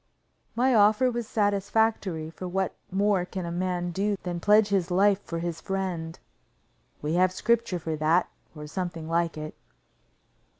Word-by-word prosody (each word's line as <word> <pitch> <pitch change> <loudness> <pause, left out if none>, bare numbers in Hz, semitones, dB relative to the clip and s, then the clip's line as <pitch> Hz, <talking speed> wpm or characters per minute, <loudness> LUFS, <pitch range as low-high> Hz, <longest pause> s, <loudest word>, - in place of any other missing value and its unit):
My 255 +2 +3
offer 220 +4 +4
was 235 -2 -3
satisfactory, 205 -5 0
for 185 +2 -7
what 190 +1 -1 0.2
more 195 -1 +2
can 180 0 -5
a 170 - -4
man 175 0 -2
do 200 +3 0
than 175 -1 -3
pledge 210 +3 +4
his 190 -3 +1
life 195 +2 +3
for 170 - -5
his 165 -1 -4
friend? 185 -4 -3 0.9
We 150 +2 -1
have 180 +1 +3
scripture 230 0 +1
for 160 -1 -3
that, 155 +3 +2 0.3
or 150 0 -8
something 170 0 -4
like 165 0 0
it. 155 0 -6
185 Hz, 155 wpm, -27 LUFS, 170-205 Hz, 0.9 s, offer